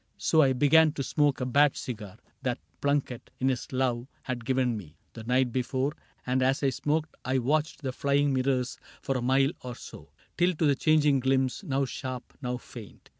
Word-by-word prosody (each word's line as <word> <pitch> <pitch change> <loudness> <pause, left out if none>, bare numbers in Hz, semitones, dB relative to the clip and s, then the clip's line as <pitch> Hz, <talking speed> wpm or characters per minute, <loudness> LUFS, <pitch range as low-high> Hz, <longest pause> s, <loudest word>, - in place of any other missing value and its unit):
So 160 - +3
I 135 -3 +4
began 150 +4 +5
to 140 - -3
smoke 145 0 +1
a 125 - -1
bad 140 +3 +3
cigar 105 -6 -6 0.2
That - - -1 0.2
Plunket, 140 -4 -1
in 130 - +2
his 125 -2 -3
love, 125 -2 0 0.2
had 120 -3 -4
given 130 -2 +1
me 85 -7 -9 0.2
The 115 - -9
night 125 +1 +2
before; 130 +3 -1 0.3
and 130 +1 +1
as 135 +2 +1
I 135 - +3
smoked 155 +4 -1
I 130 +1 0
watched 150 +3 0
The 130 - -1
flying 140 +1 +1
mirrors 130 -1 0 0.2
for 135 - -2
a 130 - -1
mile 135 +3 +3
or 125 -1 -6
so, - - -11 0.3
Till 175 0 +3
to 155 - +1
the 145 - +5
changing 150 -1 +3
glimpse, 130 0 +1
now 135 0 0
sharp, 130 -1 -6
now 125 -1 -2
faint. 115 -4 -12
130 Hz, 190 wpm, -28 LUFS, 125-145 Hz, 0.3 s, began